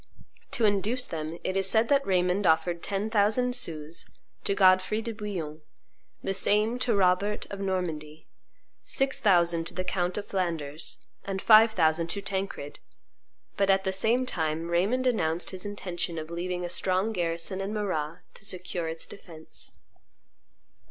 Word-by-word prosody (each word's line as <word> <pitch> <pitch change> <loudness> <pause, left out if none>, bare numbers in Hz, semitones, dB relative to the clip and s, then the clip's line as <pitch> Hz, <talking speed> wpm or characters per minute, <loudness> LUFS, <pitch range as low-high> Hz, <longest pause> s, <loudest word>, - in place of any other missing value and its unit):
To 230 - +2
induce 210 +5 +1
them, 160 0 -5
it 185 - -2
is 195 0 +2
said 225 +2 +4
that 280 -1 +3
Raymond 180 +1 +2
offered 170 +1 +2
ten 205 +2 -2
thousand 225 +4 +3
sous 165 -9 -3 0.4
to 200 - +2
Godfrey 185 +2 +4
de 230 +1 -4
Bouillon, 180 -8 -5 0.6
the 195 - 0
same 210 +5 +2
to 245 -3 +1
Robert 195 +2 +2
of 200 - -5
Normandy, 160 -5 -3 0.6
six 270 0 0
thousand 170 -4 +3
to - - -9
the 185 - -1
count 180 0 -1
of 205 - -3
Flanders, 165 -5 -3 0.3
and 195 -1 -3
five 220 +2 +7
thousand 165 -2 +2
to 200 +4 -2
Tancred; 190 -7 -4 0.8
but, 195 -1 +2
at 195 0 +4
the 190 -1 -1
same 230 +6 +2
time, 160 -5 -2
Raymond 200 +10 +1
announced 170 -9 0
his 185 +1 -5
intention 180 -4 -4
of 155 +1 -6
leaving 180 +1 -3
a - - -2
strong 185 +4 0
garrison 170 +1 -2
in 195 +1 -3
Marrah 180 -6 -2
to - - -13
secure 180 -3 -3
its 160 0 -4
defence. 165 -5 -5
185 Hz, 155 wpm, -28 LUFS, 170-205 Hz, 0.8 s, five